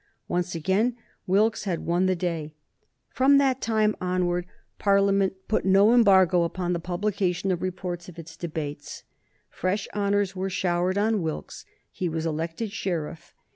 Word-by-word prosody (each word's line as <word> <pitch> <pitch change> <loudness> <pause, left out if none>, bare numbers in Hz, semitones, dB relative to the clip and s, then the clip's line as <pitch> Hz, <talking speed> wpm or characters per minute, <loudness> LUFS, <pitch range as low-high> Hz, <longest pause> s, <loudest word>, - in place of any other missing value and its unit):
Once 180 0 -1
again 200 +9 +1 0.3
Wilkes 210 +5 +2
had 180 -4 -2
won 175 +2 +2
the 185 - +2
day. 165 -4 -3 0.6
From 270 +3 +4
that 270 -2 +2
time 215 -1 +2
forward 180 -1 0 0.3
Parliament 200 -1 +3
put 220 - +1
no 195 +4 +5
embargo 190 -6 +5
upon 175 +1 -1
the 170 - -1
publication 185 +1 -1
of 175 - -1
reports 180 -1 -4
of 175 - -13
its 165 0 -10
debates. 150 -4 -6 0.4
Fresh 195 +2 -2
honors 200 -1 0
were 190 +1 -2
showered 185 0 0
on 215 0 +1
Wilkes. 160 -2 -5 0.3
He 180 - -3
was 160 0 -3
elected 165 +7 -3
sheriff. 170 -5 -4
185 Hz, 145 wpm, -26 LUFS, 175-200 Hz, 0.6 s, no